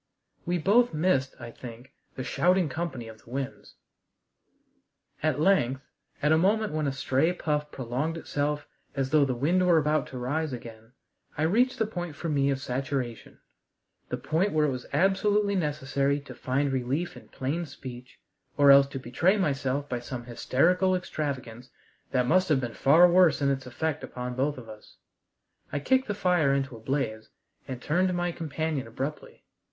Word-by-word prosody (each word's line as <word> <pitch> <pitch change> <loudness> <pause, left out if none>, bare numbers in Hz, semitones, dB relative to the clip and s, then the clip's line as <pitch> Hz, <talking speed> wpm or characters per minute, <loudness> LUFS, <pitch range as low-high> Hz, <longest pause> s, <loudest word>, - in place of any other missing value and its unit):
We 175 0 +1
both 210 +4 +3
missed, 150 -5 +1
I 120 -1 -8
think, 120 +2 -11 0.2
the 130 - -4
shouting 180 +3 +2
company 140 -6 -4
of 110 -1 -12
the - - -18
winds. 135 +2 -5 1.5
At 155 -1 +1
length, 140 -7 +2 0.4
at 150 - +3
a 160 - +5
moment 210 +2 +2
when 155 -1 0
a - - +1
stray 135 +4 +1
puff 150 -3 -2
prolonged 135 +6 -3
itself 145 -2 -2 0.3
as 135 -2 -1
though 150 -2 +5
the 130 -2 -1
wind 170 +9 +2
were 170 -2 +5
about 155 0 +1
to 130 - -8
rise 145 +4 -2
again, 115 -1 -10 0.4
I 155 - 0
reached 245 +10 +2
the 220 - +1
point 175 -7 -5
for 165 +3 -4
me 140 -2 +2
of 135 -1 0
saturation, 130 -2 -4 0.7
the - - -2
point 180 +6 0
where 155 -1 +3
it 145 - +1
was 125 -1 -6
absolutely 200 +5 +2
necessary 145 -4 0
to 140 - -10
find 135 +2 -1
relief 135 +6 -2
in - - -13
plain 155 +6 -3
speech, 125 -3 -10 0.4
or 140 -1 +7
else 140 0 +7
to 140 - -6
betray 150 - +1
myself 140 -5 -1
by 125 -2 -2
some 120 0 -6
hysterical 180 +10 +2
extravagance 135 -8 -4 0.4
that 125 -2 +1
must 185 +7 +3
have 150 -4 +4
been 120 -3 -4
far 160 +6 +6
worse 175 -1 +5
in 140 -1 +2
its 135 -1 -3
effect 155 +4 -3
upon 125 0 -5
both 135 +3 -1
of 120 -3 -10
us. 110 -1 -13 0.7
I - - -1
kicked 260 - +2
the 205 - -2
fire 175 -8 +2
into 135 -2 -2
a - - -10
blaze, 110 -3 -2 0.4
and 130 -2 -5
turned 175 +8 +1
to 180 - -1
my 175 0 0
companion 160 -4 -3
abruptly. 135 +6 -6
145 Hz, 175 wpm, -27 LUFS, 130-170 Hz, 1.5 s, or